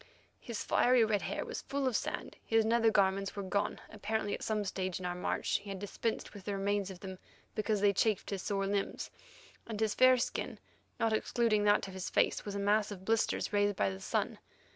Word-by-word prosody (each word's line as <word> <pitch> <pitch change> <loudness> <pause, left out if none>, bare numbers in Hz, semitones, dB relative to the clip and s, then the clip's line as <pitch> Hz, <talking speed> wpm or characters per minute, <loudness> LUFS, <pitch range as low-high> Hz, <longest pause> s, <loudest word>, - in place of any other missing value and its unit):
His 235 -3 -5
fiery 245 -2 +4
red 210 -2 +1
hair - - -3
was - - -5
full 275 -1 -1
of 250 - 0
sand, - - -3
his 225 -1 +3
nether 230 0 +4
garments 195 -2 +2
were 200 - -3
gone, 200 +2 -1
apparently 210 0 -2
at - - -4
some 215 -1 0
stage 185 -2 -2
in 180 - -6
our 180 - -1
march 180 - -1
he 200 0 -11
had 195 - -4
dispensed 205 +3 -3
with 205 -2 -11
the 200 -1 -2
remains 200 0 0
of 185 -2 -9
them 190 -2 -7 0.3
because 215 -1 0
they 205 -1 +5
chafed 210 0 +1
his 195 -2 -2
sore 195 -1 -1
limbs, 200 0 -2 0.6
and 220 -2 -4
his 220 -2 +1
fair 255 0 +6
skin, 240 - -2 0.4
not 225 -2 +2
excluding 220 -1 +2
that 205 -1 +4
of 190 - -9
his 190 -1 -4
face, - - +2
was 205 -1 -4
a - - -1
mass 205 +1 +2
of 190 -2 -8
blisters, 225 0 +1
raised 205 0 +3
by 100 - +1
the 95 - -7
sun. - - -1
205 Hz, 215 wpm, -33 LUFS, 195-220 Hz, 0.6 s, fair